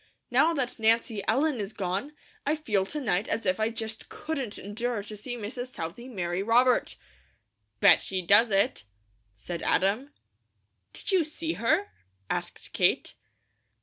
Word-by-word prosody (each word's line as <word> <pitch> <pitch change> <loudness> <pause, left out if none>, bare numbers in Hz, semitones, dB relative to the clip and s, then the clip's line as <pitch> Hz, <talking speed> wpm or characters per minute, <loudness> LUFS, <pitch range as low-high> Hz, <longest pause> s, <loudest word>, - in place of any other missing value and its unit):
Now 330 - +5
that 250 -4 -2
Nancy 225 -1 +2
Ellen 275 +3 +2
is 205 +1 -4
gone, 195 +10 -3 0.3
I 295 +2 +1
feel 210 -11 0
to 300 - -4
night 210 -7 0
as 225 - 0
if 185 +2 +1
I 220 +1 +2
just 225 -1 -5
couldn't 275 -9 -4
endure 220 +2 -3
to 215 +1 -7
see 245 +4 -5
Mrs. 245 +3 -5
Southey 225 +1 -6
marry 180 -6 -2
Robert." 245 +4 +3 0.9
"Bet - - +7
she 185 -1 -2
does 205 +6 +6
it!" 195 - +2 0.5
said 170 - -6
Adam. 215 - +1 0.8
"Did - - -5
you 370 -3 +4
see 320 +2 -3
her?" 320 - +1 0.4
asked - - -4
Kate. - - +2
225 Hz, 150 wpm, -28 LUFS, 200-260 Hz, 0.9 s, Bet